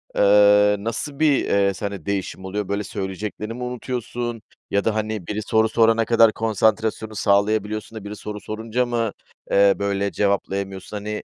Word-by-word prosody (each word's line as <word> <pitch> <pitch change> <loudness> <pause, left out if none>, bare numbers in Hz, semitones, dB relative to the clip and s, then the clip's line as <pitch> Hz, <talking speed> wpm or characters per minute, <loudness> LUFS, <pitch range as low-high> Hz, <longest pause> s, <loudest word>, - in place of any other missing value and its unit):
eee, 105 0 +5
nasıl 115 +6 -4
bir, 155 -2 +4
eee, 100 -1 +2
sende 100 -3 -5
değişim 95 -1 -3
oluyor? 100 +1 -3
Böyle, 100 +1 -2
söyleyeceklerini 105 +3 -5
mi 125 - -6
unutuyorsun? 120 -1 -4 0.3
Ya 100 0 +2
da, 110 -1 +1
hani, 110 -4 -3
biri 105 0 -3
soru 110 +1 +2
sorana 115 0 +3
kadar 115 -1 +5
konsantrasyonu 110 0 0
sağlayabiliyorsun 105 +2 0
da - - -13
biri 105 +1 -6
soru 105 0 -7
sorunca 110 +3 -2
mı, 115 -3 -1 0.4
eee, 100 0 +5
böyle, 100 0 -1
cevaplayamıyorsun, 100 0 -2
hani, 105 +1 -5
105 Hz, 155 wpm, -22 LUFS, 100-110 Hz, 0.4 s, eee